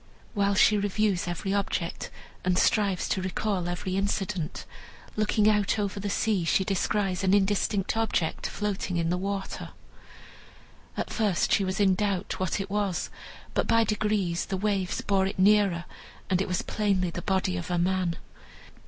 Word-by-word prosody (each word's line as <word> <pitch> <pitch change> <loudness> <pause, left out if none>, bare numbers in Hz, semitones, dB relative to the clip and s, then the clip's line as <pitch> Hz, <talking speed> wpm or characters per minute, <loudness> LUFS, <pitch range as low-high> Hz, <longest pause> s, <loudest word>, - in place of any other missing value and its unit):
While 200 -2 +2
she 210 +1 +5
reviews 200 -2 0
every 175 +3 -2
object, 195 -4 -2 0.3
and 180 0 +1
strives 200 -4 +2
to 190 - 0
recall 190 -1 -1
every 185 +1 -2
incident, 195 -4 -2 0.5
looking 215 0 +2
out 210 0 +3
over 200 -1 -2
the 200 +1 -3
sea, 200 -2 +1
she 165 +3 +2
descries 195 -1 0
an 190 +1 +4
indistinct 200 0 +1
object 220 -7 0
floating 200 -3 -2
in 165 0 0
the - - +2
water. 195 0 -4 1.3
At - - -3
first 205 -6 +1
she 200 - +4
was 190 +1 -2
in 195 -2 +5
doubt 200 -1 -1
what 185 +2 -1
it 195 0 -4
was, 205 -3 -1 0.4
but - - 0
by 230 0 +4
degrees 210 -5 0
the 190 - -2
waves 195 -2 -1
bore 195 -1 +2
it - - -5
nearer, 195 -3 +4 0.5
and 185 0 +3
it - - -1
was 180 -1 -1
plainly 195 -4 0
the 175 - -5
body 190 -1 0
of 175 0 -4
a 175 - 0
man. 180 -1 +1
195 Hz, 160 wpm, -27 LUFS, 185-205 Hz, 1.3 s, she